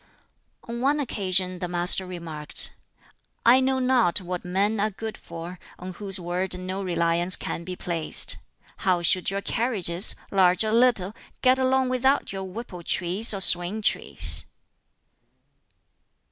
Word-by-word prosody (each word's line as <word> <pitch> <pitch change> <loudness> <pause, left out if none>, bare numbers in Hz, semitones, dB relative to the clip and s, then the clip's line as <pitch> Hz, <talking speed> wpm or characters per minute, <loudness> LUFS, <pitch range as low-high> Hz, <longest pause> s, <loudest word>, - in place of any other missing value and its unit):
On 235 +1 -6
one 285 +3 +1
occasion 185 -8 -2
the 180 - -4
Master 175 +2 +1
remarked, 165 -4 +2 0.7
"I 245 +3 +6
know 265 0 0
not 250 -8 +2
what 180 -1 -6
men 200 +4 -1
are 215 +2 +1
good 220 +2 -7
for, 170 +1 -10 0.2
on 185 +1 -8
whose 195 0 -4
word 180 +1 -3
no 185 +2 -5
reliance 175 -1 +1
can 170 - -6
be 180 +1 -7
placed. 170 -3 +1 0.4
How 180 -2 0
should 180 +2 +2
your 195 +1 -3
carriages, 200 -6 +1 0.2
large 185 0 +3
or 215 - -2
little, 225 -5 +2 0.3
get 255 +1 +4
along 260 0 +1
without 265 +3 0
your 190 0 -5
whipple 190 -2 -9
trees 185 +5 +1
or 200 -2 0
swing 180 +4 +3
trees?" - - +4
190 Hz, 140 wpm, -24 LUFS, 180-230 Hz, 0.7 s, I